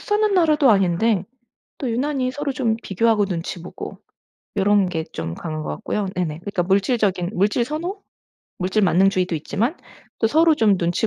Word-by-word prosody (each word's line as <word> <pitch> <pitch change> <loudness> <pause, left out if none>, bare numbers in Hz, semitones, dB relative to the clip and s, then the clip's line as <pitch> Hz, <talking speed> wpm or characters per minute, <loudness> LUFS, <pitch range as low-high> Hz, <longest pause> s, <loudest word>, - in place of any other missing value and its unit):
사는 420 0 +1
나라도 310 -7 +4
아닌데 195 +1 +2 0.5
또 260 - -2
유난히 260 +2 -1
서로 280 +1 -3
좀 240 -4 0
비교하고 210 +2 +2
눈치 175 -2 -4
보고 180 - -8 0.6
요런 200 -1 +3
게 165 -3 -2
좀 80 0 -4
강한 155 -2 -5
것 - - -5
같고요. 210 -1 -3
네네. 160 -4 -2
그러니까 190 0 -2
물질적인 195 -1 +1
물질 205 +6 +2
선호? 345 - -4 0.6
물질만능주의도 185 -1 +2
있지만 220 - -2 0.4
또 - - +2
서로 320 +6 +4
좀 210 -3 +4
눈치 175 +4 0
205 Hz, 340 characters per minute, -22 LUFS, 180-255 Hz, 0.6 s, 나라도